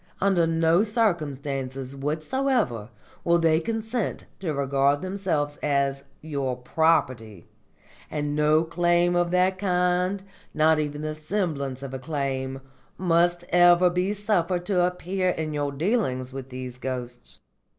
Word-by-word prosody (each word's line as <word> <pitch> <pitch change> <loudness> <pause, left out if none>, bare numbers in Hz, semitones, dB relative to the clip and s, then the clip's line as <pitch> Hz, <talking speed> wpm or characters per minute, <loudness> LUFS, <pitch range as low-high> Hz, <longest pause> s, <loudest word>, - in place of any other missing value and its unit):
Under 185 -4 +3
no 165 +2 +3
circumstances 140 - -2
whatsoever 150 - -1 0.3
will 170 0 +4
they 165 -1 +3
consent 225 +3 -3
to 175 -5 -2
regard 140 +1 +1
themselves 180 -7 -1
as 140 -1 0 0.2
your 140 -5 -2
property, 125 - 0 0.6
and 145 -1 -2
no 150 +1 +3
claim 175 +1 +2
of 175 0 +2
that 185 +1 +2
kind, 180 0 +1 0.3
nor 155 0 +4
even 150 0 -3
the 155 0 -2
semblance 155 -5 -3
of 135 -1 -6
a 130 - -4
claim, 135 -2 -3 0.4
must 175 0 +2
ever 175 0 +6
be 180 +3 0
suffered 185 -4 0
to 180 -3 +2
appear 180 +1 -1
in 160 -3 -2
your 145 -1 -1
dealings 140 - -1
with 135 -1 -7
these 125 -1 -7
ghosts. 125 -2 -6
160 Hz, 130 wpm, -25 LUFS, 140-180 Hz, 0.6 s, ever